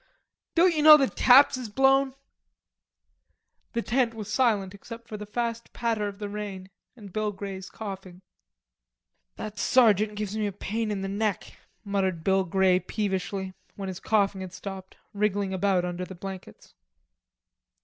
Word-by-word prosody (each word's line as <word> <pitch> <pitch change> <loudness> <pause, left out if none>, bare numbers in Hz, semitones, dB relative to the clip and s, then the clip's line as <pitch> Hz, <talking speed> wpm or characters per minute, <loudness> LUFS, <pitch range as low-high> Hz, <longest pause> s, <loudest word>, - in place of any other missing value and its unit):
"Don't 350 +1 +5
you 305 - +1
know 305 0 +10
that 270 -3 0
taps 265 +2 +6
has 250 -4 -6
blown?" 270 +3 +3 1.6
The 235 -1 -1
tent 240 -2 +1
was 215 -1 -6
silent 210 -7 +1
except 230 +3 -11
for 215 - -7
the 210 0 -7
fast 230 +1 -3
patter 225 -3 -1
of 200 -1 -7
the 205 0 -5
rain 200 -2 -6 0.2
and 205 -6 -12
Bill 215 -1 -1
Grey's 195 -1 -7
coughing. 190 -3 -8 1.1
"That 210 -1 -7
sergeant 215 -4 +4
gives 210 -1 -4
me 215 -1 0
a - - -3
pain 215 +3 -3
in 200 -2 -3
the - - -2
neck," 205 0 -2 0.3
muttered 190 -4 -1
Bill 190 +1 +3
Grey 185 0 +3
peevishly, 190 -2 -3 0.2
when 195 -1 -5
his 185 -1 -6
coughing 200 -3 +1
had 185 -1 -7
stopped, 190 -1 -8 0.2
wriggling 200 -1 0
about 190 -1 +1
under 175 0 -4
the 190 - -10
blankets. 190 +1 -9
205 Hz, 155 wpm, -27 LUFS, 190-225 Hz, 1.6 s, know